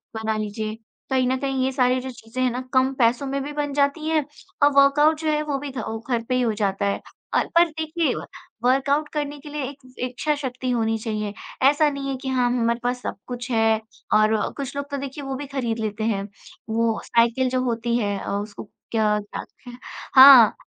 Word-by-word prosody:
बना 220 Hz, 0 st, -1 dB
लीजिए। 215 Hz, +1 st, -4 dB, 0.3 s
कहीं 260 Hz, -1 st, +2 dB
न 260 Hz, -, +1 dB
कहीं 270 Hz, -1 st, -1 dB
ये 265 Hz, -, +1 dB
सारे 255 Hz, -1 st, +2 dB
जो 260 Hz, -, -6 dB
चीज़ें 235 Hz, +2 st, -7 dB
हैं 250 Hz, -, +3 dB
ना, 250 Hz, +2 st, -3 dB
कम 260 Hz, +1 st, +3 dB
पैसों 245 Hz, +1 st, +2 dB
में 275 Hz, +1 st, -2 dB
भी 295 Hz, -, -5 dB
बन 290 Hz, -1 st, -2 dB
जाती 285 Hz, +2 st, +1 dB
हैं 315 Hz, -3 st, +1 dB, 0.4 s
और 290 Hz, -, +6 dB
वर्कआउट 295 Hz, +3 st, +5 dB
जो 315 Hz, -, -3 dB
है, 300 Hz, 0 st, +1 dB
वो 290 Hz, -2 st, -2 dB
भी 285 Hz, -, -6 dB
घ 260 Hz, -, -10 dB
औ 225 Hz, -, -4 dB
घर 235 Hz, -2 st, 0 dB
पे 255 Hz, -, +2 dB
ही 255 Hz, -, +2 dB
हो 225 Hz, -3 st, +1 dB
जाता 200 Hz, -1 st, -1 dB
है। 200 Hz, -, 0 dB, 0.3 s
अ, -, -, +3 dB
पर 345 Hz, 0 st, +7 dB
देखिए, 315 Hz, -2 st, -1 dB
व -, -, -6 dB, 0.4 s
वर्कआउट 275 Hz, +4 st, +2 dB
करने 290 Hz, -1 st, -3 dB
के 295 Hz, +1 st, -11 dB
लिए 295 Hz, -1 st, -4 dB
एक 280 Hz, 0 st, -12 dB, 0.2 s
इच्छाशक्ति 255 Hz, 0 st, -2 dB
होनी 225 Hz, -2 st, +1 dB
चाहिए, 215 Hz, -2 st, -3 dB, 0.4 s
ऐसा 295 Hz, +1 st, +3 dB
नहीं 280 Hz, -1 st, -4 dB
है 270 Hz, -, -1 dB
कि 265 Hz, -, -6 dB
हाँ, 250 Hz, -2 st, +2 dB
हमारे 235 Hz, +1 st, +1 dB
पास 250 Hz, 0 st, -1 dB
सब -, -, -4 dB
कुछ 245 Hz, 0 st, -6 dB
है 225 Hz, -1 st, +2 dB, 0.3 s
और 215 Hz, +1 st, +4 dB
व 210 Hz, -, -1 dB
कुछ 280 Hz, -1 st, -5 dB
लोग 280 Hz, 0 st, -4 dB
तो 280 Hz, -, -2 dB
देखिए 275 Hz, +1 st, -6 dB
वो 270 Hz, -1 st, -4 dB
भी 285 Hz, -, -5 dB
खरीद 235 Hz, -3 st, -1 dB
लेते 215 Hz, 0 st, -3 dB
हैं, 205 Hz, -3 st, 0 dB, 0.5 s
वो 225 Hz, 0 st, +1 dB
साइकिल 235 Hz, +2 st, +2 dB
जो 255 Hz, 0 st, 0 dB
होती 235 Hz, -1 st, 0 dB
है 205 Hz, -3 st, -1 dB
अ, -, -, -6 dB
उसको 205 Hz, +1 st, -4 dB, 0.3 s
क्या 215 Hz, -2 st, +2 dB
कहते 205 Hz, +4 st, -9 dB
हैं, 245 Hz, 0 st, -11 dB, 0.4 s
हाँ 260 Hz, -4 st, +9 dB
255 Hz, 220 wpm, -23 LUFS, 225-280 Hz, 0.5 s, हाँ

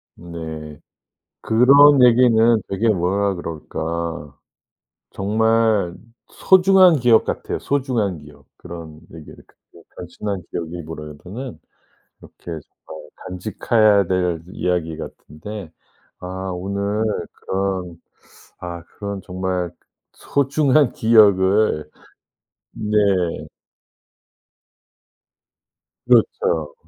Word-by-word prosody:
네. 80 Hz, -3 st, -8 dB, 0.6 s
그런 140 Hz, +4 st, +6 dB
얘기는 115 Hz, -2 st, +4 dB
되게 100 Hz, +4 st, 0 dB
뭐라 100 Hz, 0 st, +1 dB
그럴까 80 Hz, -2 st, -5 dB, 0.7 s
정말 110 Hz, -2 st, +1 dB, 0.3 s
소중한 185 Hz, -2 st, +5 dB
기억 120 Hz, -2 st, +4 dB
같아요 -, -, -4 dB
소중한 120 Hz, -, -1 dB
기억. 75 Hz, 0 st, -16 dB
그런 85 Hz, -3 st, -10 dB
얘기를 80 Hz, -2 st, -12 dB, 0.4 s
그냥 -, -, -18 dB
단순한 95 Hz, +2 st, -5 dB
기억이 85 Hz, 0 st, -5 dB
뭐라 75 Hz, -1 st, -8 dB
보다는 110 Hz, -, -9 dB, 0.6 s
이렇게 -, -, -19 dB
잘 80 Hz, -2 st, -5 dB, 0.7 s
간직해야 105 Hz, +2 st, +2 dB
될 90 Hz, -2 st, -1 dB
이야기 85 Hz, -4 st, -2 dB
같은데 85 Hz, +6 st, -9 dB, 0.5 s
아 -, -, -9 dB, 0.3 s
오늘 100 Hz, +3 st, -2 dB, 0.3 s
그런 95 Hz, -3 st, -4 dB, 0.6 s
아 85 Hz, -1 st, -7 dB
그런 100 Hz, +2 st, -7 dB
정말 90 Hz, -1 st, -3 dB, 0.4 s
소중한 140 Hz, -1 st, +1 dB
기억을 100 Hz, -6 st, +3 dB, 0.8 s
네. 100 Hz, -5 st, 0 dB, 2.6 s
그렇죠. 80 Hz, -3 st, +1 dB
95 Hz, 180 characters per minute, -20 LUFS, 85-110 Hz, 2.6 s, 그런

